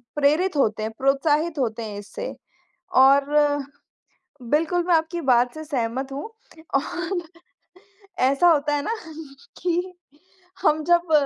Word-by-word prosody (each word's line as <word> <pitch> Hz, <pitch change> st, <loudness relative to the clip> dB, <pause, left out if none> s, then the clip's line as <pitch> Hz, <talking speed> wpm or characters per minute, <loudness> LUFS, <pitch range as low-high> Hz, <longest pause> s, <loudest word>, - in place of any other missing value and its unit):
प्रेरित 305 Hz, +5 st, +2 dB
होते 215 Hz, -5 st, +1 dB
हैं 220 Hz, -, -3 dB
प्रोत्साहित 295 Hz, +3 st, +1 dB
होते 230 Hz, -2 st, -1 dB
हैं 210 Hz, -2 st, -6 dB
इससे। -, -, -7 dB, 0.6 s
और 270 Hz, +2 st, +6 dB, 1.3 s
बिल्कुल 330 Hz, +3 st, +2 dB
मैं 355 Hz, -, +3 dB
आपकी 325 Hz, +2 st, 0 dB
बात 245 Hz, +1 st, +3 dB
से 315 Hz, 0 st, -7 dB
सहमत 265 Hz, -1 st, -3 dB
हूँ। 280 Hz, -, -5 dB, 0.5 s
और 350 Hz, +6 st, -1 dB, 1.0 s
ऐसा 275 Hz, +7 st, +4 dB
होता 295 Hz, -2 st, +2 dB
है 285 Hz, -, -2 dB
ना 450 Hz, -, -1 dB, 0.7 s
कि 360 Hz, +1 st, -1 dB, 0.7 s
हम 305 Hz, +1 st, +3 dB
जब 345 Hz, -1 st, +2 dB
295 Hz, 125 wpm, -23 LUFS, 265-340 Hz, 1.3 s, और